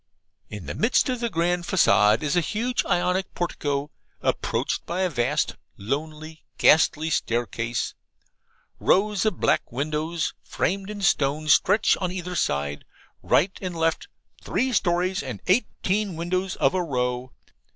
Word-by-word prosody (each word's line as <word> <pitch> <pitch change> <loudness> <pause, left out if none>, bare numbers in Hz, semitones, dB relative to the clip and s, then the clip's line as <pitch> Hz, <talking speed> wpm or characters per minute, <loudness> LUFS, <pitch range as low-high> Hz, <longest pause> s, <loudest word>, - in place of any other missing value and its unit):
In 105 -3 -8
the - - -4
midst 230 +4 +2
of 250 -1 -1
the 235 -1 -1
grand 175 -1 0
facade 105 - +4
is 150 +1 0
a 175 - +4
huge 225 - -1
Ionic 180 +2 0
portico, 145 -4 -2 0.3
approached - - -1
by 175 +3 -2
a 185 -2 +1
vast, 135 +3 0 0.2
lonely, 155 +7 -5
ghastly 160 0 +4
staircase. 115 -2 -1 0.9
Rows 205 +1 +2
of 215 - -1
black - - +1
windows, 155 +5 -2
framed 195 +2 -2
in 205 -1 -6
stone, 150 -2 +1
stretch 205 +8 +4
on 185 -2 -2
either 180 -1 -5
side, 70 - -1 0.4
right 190 +5 +2
and 180 -2 -4
left 165 -1 0 0.4
three 260 0 0
storeys 180 -1 +1
and 130 -7 -6
eighteen 200 -1 0
windows 180 +3 -2
of - - +2
a 185 - +1
row. 125 -4 -2
170 Hz, 140 wpm, -25 LUFS, 140-190 Hz, 0.9 s, facade